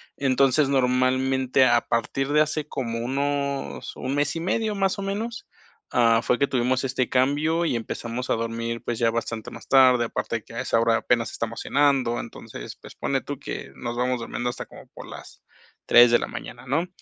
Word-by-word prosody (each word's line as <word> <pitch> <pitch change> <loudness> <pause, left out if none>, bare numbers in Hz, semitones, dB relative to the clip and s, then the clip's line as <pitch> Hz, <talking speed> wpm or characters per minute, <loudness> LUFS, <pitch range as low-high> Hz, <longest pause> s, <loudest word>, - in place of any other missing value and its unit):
entonces 135 +1 +2
normalmente 130 0 +2
a 120 -1 +4
partir 135 +4 -1
de 150 - +5
hace 155 0 -1
como 115 -4 -3
unos 140 +2 -2
1 130 +1 -3
mes 145 +1 0
y 165 - -2
medio 210 +5 -1
más 195 0 0
o - - -2
menos, 220 +5 -4 0.4
ah, 115 -1 +4
fue 125 - +2
que 140 - +3
tuvimos 130 0 0
este 130 -1 -1
cambio 150 +6 +1
y 140 - 0
empezamos 115 +2 -4
a - - +3
dormir 115 0 -3
pues 120 -1 -3
ya 115 -1 +3
bastante 115 -1 -3
más - - -11
tarde, 130 -3 +5
aparte 115 - -3
de 110 - -12
que - - -15
a - - -3
esa 115 - +1
hora 115 0 +3
apenas 115 -2 0
estamos 115 0 -4
cenando, 135 -5 +2
entonces, 110 - -8
pues - - -13
ponle - - -1
tú - - -6
que - - -6
nos 120 0 -5
vamos 125 0 0
durmiendo 120 +1 -3
hasta - - -7
como - - -14
por - - -10
las - - -12 0.4
3 120 0 +7
de 120 - +5
la - - -3
mañana 120 +1 -8
¿no? 160 +7 0
130 Hz, 195 wpm, -24 LUFS, 115-140 Hz, 0.4 s, 3